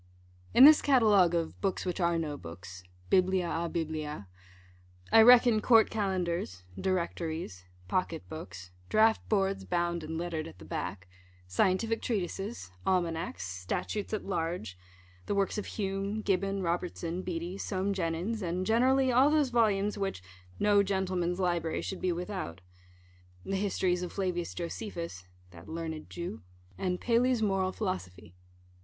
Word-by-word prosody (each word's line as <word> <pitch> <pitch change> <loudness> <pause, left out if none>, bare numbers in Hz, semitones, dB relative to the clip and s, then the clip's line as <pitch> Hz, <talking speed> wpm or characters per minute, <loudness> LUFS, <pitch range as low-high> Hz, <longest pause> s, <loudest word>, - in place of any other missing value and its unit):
In 250 - +9
this 305 +1 +9
catalogue 210 - +4
of 165 -1 -2
books 195 -1 -1
which 180 +1 -2
are 170 -1 +2
no 155 -3 -2
books 90 -1 -10 0.3
biblia 185 -1 +3
a 170 0 -2
biblia 155 - -4 0.8
I 225 - +8
reckon 240 -1 +7
Court 225 -1 +5
Calendars, 175 - -2
Directories, 165 - -3 0.2
Pocket 165 - -2
Books, 90 - -9 0.2
Draught 220 +1 +4
Boards 195 -2 +1
bound 170 -2 -1
and 160 +1 -4
lettered 165 -2 -3
at 165 - -12
the - - -12
back, 90 +1 -5 0.4
Scientific 185 - +1
Treatises, 200 - -3
Almanacks, 165 - -1
Statutes 90 - -3
at 215 - -3
Large; 165 - -3 0.5
the 205 - 0
works 200 +1 0
of - - -6
Hume, 200 +1 -3
Gibbon, 195 0 0
Robertson, 175 0 -2
Beattie, 180 +1 -4
Soame 195 0 -1
Jenyns, 185 +5 -2
and, 180 +1 -2
generally, 255 +4 +3
all 260 +4 +5
those 300 -3 +3
volumes 210 -3 +2
which 195 - -3 0.4
"no 205 -1 +5
gentleman's 185 -2 -1
library 175 -3 0
should 190 - -5
be 185 - +1
without:" 175 - -5 0.8
the 195 - -2
Histories 190 -2 0
of 180 - -4
Flavins 180 -3 -2
Josephus 170 - -5 0.2
(that 85 +1 -13
learned 160 -1 -5
Jew), 170 -11 -6 0.3
and 180 - -2
Paley's 245 0 +2
Moral 195 -2 +1
Philosophy. 95 - -5
180 Hz, 135 wpm, -30 LUFS, 165-200 Hz, 0.8 s, In